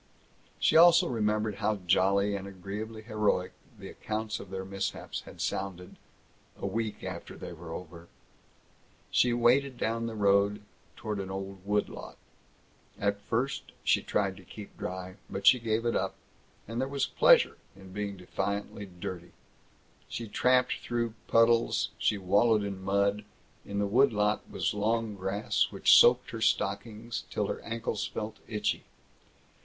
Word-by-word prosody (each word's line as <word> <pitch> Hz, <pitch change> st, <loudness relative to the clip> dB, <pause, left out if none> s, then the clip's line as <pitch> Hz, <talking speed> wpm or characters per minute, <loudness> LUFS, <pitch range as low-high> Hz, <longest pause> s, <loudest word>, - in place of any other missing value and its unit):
She -, -, +2 dB
also 170 Hz, +2 st, +7 dB
remembered 105 Hz, -3 st, 0 dB
how 110 Hz, +2 st, +1 dB
jolly 100 Hz, +3 st, +3 dB
and 100 Hz, 0 st, -5 dB
agreeably 105 Hz, +4 st, -7 dB
heroic 105 Hz, -4 st, 0 dB, 0.3 s
the 100 Hz, -1 st, -9 dB
accounts 110 Hz, +2 st, -4 dB
of 100 Hz, -, -10 dB
their 95 Hz, 0 st, -5 dB
mishaps 95 Hz, 0 st, -4 dB
had -, -, -12 dB
sounded 90 Hz, -2 st, -4 dB, 0.6 s
a -, -, -4 dB
week 110 Hz, -2 st, -3 dB
after 95 Hz, -2 st, -7 dB
they 90 Hz, -, -7 dB
were 85 Hz, 0 st, -10 dB
over. 85 Hz, 0 st, -8 dB, 1.0 s
She 125 Hz, -, +4 dB
waded 125 Hz, +3 st, +3 dB
down 115 Hz, 0 st, -1 dB
the 115 Hz, -, -5 dB
road 100 Hz, 0 st, +2 dB, 0.3 s
toward 105 Hz, -2 st, -4 dB
an 95 Hz, -1 st, -4 dB
old 95 Hz, -1 st, -6 dB
wood 105 Hz, 0 st, +2 dB
lot. -, -, -10 dB, 0.8 s
At 100 Hz, 0 st, 0 dB
first 130 Hz, +7 st, -2 dB
she -, -, +3 dB
tried 100 Hz, -2 st, -1 dB
to 95 Hz, -, -13 dB
keep 100 Hz, +3 st, -11 dB
dry, 95 Hz, +1 st, -6 dB
but 100 Hz, 0 st, -5 dB
she 125 Hz, -, +8 dB
gave 115 Hz, 0 st, -1 dB
it 120 Hz, -, +1 dB
up, -, -, -1 dB, 0.5 s
and 115 Hz, +3 st, -3 dB
there 130 Hz, -, 0 dB
was 140 Hz, 0 st, 0 dB
pleasure -, -, +5 dB, 0.2 s
in 95 Hz, -1 st, -13 dB
being 100 Hz, -1 st, -4 dB
defiantly 100 Hz, +2 st, -4 dB
dirty. 90 Hz, -1 st, -7 dB, 0.8 s
She 115 Hz, -, -5 dB
tramped 125 Hz, +4 st, +3 dB
straight -, -, -4 dB
through 120 Hz, -2 st, -1 dB
puddles; 115 Hz, 0 st, +3 dB
she 105 Hz, -, +2 dB
wallowed 105 Hz, +3 st, +3 dB
in 100 Hz, -2 st, -5 dB
mud. 100 Hz, +1 st, +1 dB, 0.4 s
In 100 Hz, -, -4 dB
the 100 Hz, -, +1 dB
wood 120 Hz, +6 st, +4 dB
lot 105 Hz, 0 st, 0 dB
was -, -, -1 dB
long 110 Hz, +1 st, 0 dB
grass 95 Hz, +2 st, 0 dB
which -, -, +5 dB
soaked 125 Hz, +1 st, +6 dB
her 115 Hz, -, -6 dB
stockings 110 Hz, +3 st, -1 dB
till -, -, -1 dB
her -, -, -3 dB
ankles 115 Hz, -2 st, -3 dB
felt 110 Hz, 0 st, -5 dB
itchy. 105 Hz, -2 st, -1 dB
105 Hz, 155 wpm, -29 LUFS, 95-115 Hz, 1.0 s, she